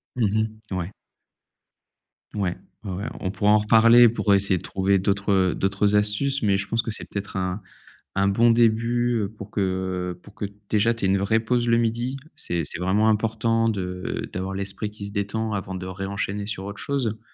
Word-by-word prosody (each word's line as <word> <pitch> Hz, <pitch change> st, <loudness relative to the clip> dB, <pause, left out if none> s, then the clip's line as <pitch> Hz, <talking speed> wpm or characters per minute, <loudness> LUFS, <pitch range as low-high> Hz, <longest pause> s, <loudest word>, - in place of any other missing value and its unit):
Mmh 110 Hz, -1 st, 0 dB
mh, -, -, -1 dB
ouais. 90 Hz, +1 st, -3 dB, 1.4 s
Ouais, 95 Hz, -4 st, -1 dB, 0.3 s
ouais, 100 Hz, -, -5 dB
ouais, 95 Hz, +3 st, -4 dB, 0.2 s
on 95 Hz, -, -2 dB
pourra 105 Hz, +2 st, +2 dB
en 105 Hz, -, +7 dB
reparler 115 Hz, +2 st, +7 dB
pour 105 Hz, -3 st, +1 dB
essayer 100 Hz, -1 st, +2 dB
de -, -, -8 dB
trouver 95 Hz, 0 st, +1 dB
d'autres, 100 Hz, +1 st, 0 dB
heu, 95 Hz, -2 st, +3 dB
d'autres 100 Hz, +2 st, +1 dB
astuces 105 Hz, +7 st, +1 dB
mais 100 Hz, -2 st, +3 dB
je 100 Hz, 0 st, -4 dB
pense 115 Hz, 0 st, +1 dB
que 115 Hz, -, -4 dB
c'est -, -, -6 dB
peut-être 100 Hz, -1 st, -5 dB
un 95 Hz, +2 st, -2 dB, 0.5 s
un 100 Hz, 0 st, +2 dB
bon 115 Hz, +4 st, +4 dB
début, 115 Hz, 0 st, +2 dB
heu, 100 Hz, -, -5 dB
pour 105 Hz, -1 st, -11 dB
que, -, -, -3 dB
heu, 95 Hz, -1 st, -2 dB
pour 105 Hz, -, -15 dB
que, 100 Hz, -, -3 dB, 0.3 s
déjà, 110 Hz, +2 st, +3 dB
tu 105 Hz, -, -3 dB
aies -, -, +3 dB
une 95 Hz, 0 st, +2 dB
vraie 105 Hz, +3 st, +2 dB
pause 120 Hz, +1 st, 0 dB
le 115 Hz, -, +4 dB
midi. 120 Hz, +3 st, -1 dB, 0.2 s
C'est 85 Hz, -1 st, -2 dB
c'est 85 Hz, -, -6 dB
vraiment 100 Hz, +4 st, +2 dB
important 115 Hz, +1 st, +1 dB
de 90 Hz, -3 st, -3 dB
d'avoir 95 Hz, +1 st, -3 dB
l'esprit 100 Hz, +2 st, -3 dB
qui 105 Hz, -1 st, -8 dB
se -, -, -9 dB
détend 110 Hz, +2 st, -2 dB
avant 95 Hz, -2 st, -4 dB
de 90 Hz, 0 st, -5 dB
ré-enchaîner 100 Hz, +2 st, -4 dB
sur 100 Hz, -3 st, -4 dB
autre 100 Hz, 0 st, -7 dB
chose, 140 Hz, -3 st, -1 dB
heu, 110 Hz, +2 st, -7 dB
100 Hz, 205 wpm, -24 LUFS, 95-110 Hz, 1.4 s, en